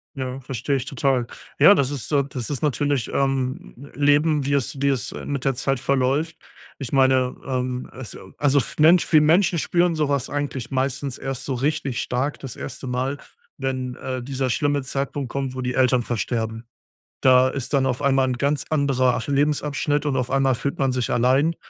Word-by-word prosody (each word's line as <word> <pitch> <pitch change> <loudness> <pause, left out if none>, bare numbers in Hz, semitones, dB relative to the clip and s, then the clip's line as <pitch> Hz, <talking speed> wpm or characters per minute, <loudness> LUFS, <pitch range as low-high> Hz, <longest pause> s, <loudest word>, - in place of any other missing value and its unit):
Ja, 130 0 -4
verstehe 130 +2 -2
ich 135 -1 -2
total. 135 -2 0 0.3
Ja, 200 - +8
das 140 -8 +1
ist, 145 0 -5
äh 140 -1 +3
das 125 -2 -5
ist 145 - -3
natürlich, 145 -2 0
ähm, 135 0 -2
Leben, 145 0 +2
wie 140 - 0
es 140 0 -1
wie 140 - +3
es, 130 -3 -2
äh, - - -7
mit 140 -2 -3
der 135 -2 +1
Zeit 135 0 -1
verläuft. 140 +4 0 0.4
Ich 135 - -5
meine, 130 -2 +3
ähm, 125 -1 -2
also 110 -6 -10
also, 145 -1 +2
f 135 - -1
Mensch 170 +4 +5
wir 155 - +8
Menschen 170 +3 +3
spüren 175 +1 +1
so 150 -2 0
was 140 -2 0
eigentlich 145 -4 -3
meistens 135 0 -2
erst 135 -2 -5
so 135 - -2
richtig 135 -1 -1
stark 130 +4 -2
das 135 -4 -8
1. 130 - -7
Mal, 130 +3 -2 0.4
wenn, 130 -2 -3
äh, 130 -1 -5
dieser 130 0 -2
schlimme 145 +3 +1
Zeitpunkt 140 0 -3
kommt, 135 -1 -3
wo 130 - -4
die 125 0 -2
Eltern 125 -1 +3
versterben. 115 -1 -3 0.6
Da 130 0 +5
ist 135 +1 -5
dann 135 -1 +3
auf 130 +2 -2
einmal 135 -1 +3
'n 125 -1 -2
ganz 140 +2 0
anderer, 135 -4 +2
ach, 115 - -4
Lebensabschnitt 145 +1 0
und 140 -2 0
auf 125 -2 -1
einmal 135 -1 +2
fühlt 140 +2 -3
man 135 -1 +2
sich 125 -2 -1
allein 135 +7 +2
135 Hz, 195 wpm, -23 LUFS, 130-145 Hz, 0.6 s, Ja